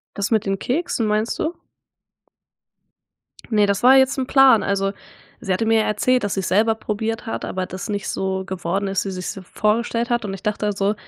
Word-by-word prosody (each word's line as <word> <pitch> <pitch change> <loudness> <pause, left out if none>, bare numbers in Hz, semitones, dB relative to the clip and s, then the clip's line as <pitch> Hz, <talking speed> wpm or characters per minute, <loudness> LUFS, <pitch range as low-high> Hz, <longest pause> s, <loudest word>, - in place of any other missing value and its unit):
Das 200 +1 -2
mit 220 -3 +1
den 195 0 -1
Keksen 250 -5 -1
meinst 215 +2 0
du? 330 +2 -2 2.0
Ne, 210 -2 +3
das 200 +3 0
war 260 +2 +7
jetzt 265 +1 +3
'n 260 - -1
Plan. 270 -4 +6
Also, 195 0 0 0.5
sie 195 - -2
hatte 185 +5 0
mir 225 0 +4
ja - - 0
erzählt, 245 +3 +1
dass 205 - -1
sie's 190 -2 -2
selber 220 +3 +3
probiert 220 +1 -3
hat, 225 - -4
aber 185 0 -3
das 185 0 -7
nicht 205 -2 -3
so 190 0 -2
geworden 190 +1 -2
ist, 195 0 -1
wie - - -2
sie's 185 -1 -4
sich 190 -2 -10
vorgestellt 230 +2 0
hat 240 -2 0
und 195 -1 -4
ich 190 - -9
dachte 210 -1 -1
so, 200 +1 0
210 Hz, 205 wpm, -21 LUFS, 195-230 Hz, 2.0 s, war